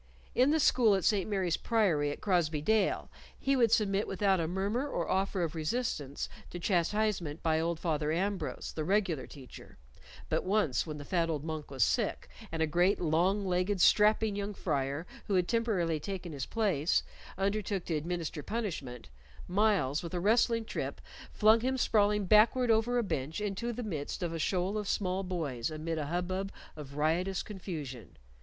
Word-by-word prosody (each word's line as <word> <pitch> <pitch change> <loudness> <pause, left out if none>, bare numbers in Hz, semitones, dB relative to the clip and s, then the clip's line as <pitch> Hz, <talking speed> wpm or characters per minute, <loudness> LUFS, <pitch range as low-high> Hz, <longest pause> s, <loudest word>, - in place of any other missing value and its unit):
In 255 +3 +4
the 315 +2 +3
school 235 -7 +4
at 190 - -1
St. 205 -2 +2
Mary's 190 -5 0
Priory 185 -11 +1
at 145 - -6
Crosbey 170 -6 +1
Dale 210 +6 +1 0.3
he 275 0 +1
would 235 -4 +3
submit 205 -2 +2
without 195 -1 +1
a 165 - 0
murmur 200 - -1
or 170 - -2
offer 190 -1 0
of 160 - -2
resistance 155 - -2 0.2
to - - -6
chastisement 175 -2 0
by 160 -1 +2
old 165 0 -1
Father 155 -3 -1
Ambrose, 185 0 -2
the 155 - -3
regular 180 -6 0
teacher; 135 -4 -13 0.5
but - - 0
once, 185 -8 +1
when 155 -1 -5
the 145 - -8
fat 170 +1 0
old 150 -3 -2
monk 155 -2 -5
was 135 -4 +1
sick, - - 0 0.2
and 160 0 0
a - - +4
great 175 +5 +2
long 180 +5 +1
legged 185 +2 0
strapping 210 +2 +4
young 205 0 -3
friar, 140 -1 -2 0.2
who 200 - +1
had 180 -1 +2
temporarily 200 -9 0
taken 180 0 -5
his 135 -2 -4
place, 185 -9 +1 0.3
undertook 195 -1 -1
to 170 - -2
administer 165 0 -3
punishment, 155 - -4 0.4
Myles, 185 -8 +2
with 170 +1 -6
a - - 0
wrestling 230 +3 +3
trip, - - -4 0.3
flung 220 +1 +5
him 260 +3 -1
sprawling 210 -4 +2
backward 225 +5 +5
over 225 +2 +2
a 240 - +2
bench 150 -4 -3
into 210 +3 -2
the 245 +1 -5
midst 165 -4 -4
of 170 -1 -2
a 165 - -3
shoal 185 +5 0
of 210 - -5
small 185 -1 0
boys 155 -11 -3
amid 160 +1 -3
a 145 - -3
hubbub 185 +4 -2 0.2
of 145 -2 -9
riotous 175 +5 0
confusion. 150 - -7
185 Hz, 175 wpm, -31 LUFS, 160-210 Hz, 0.5 s, flung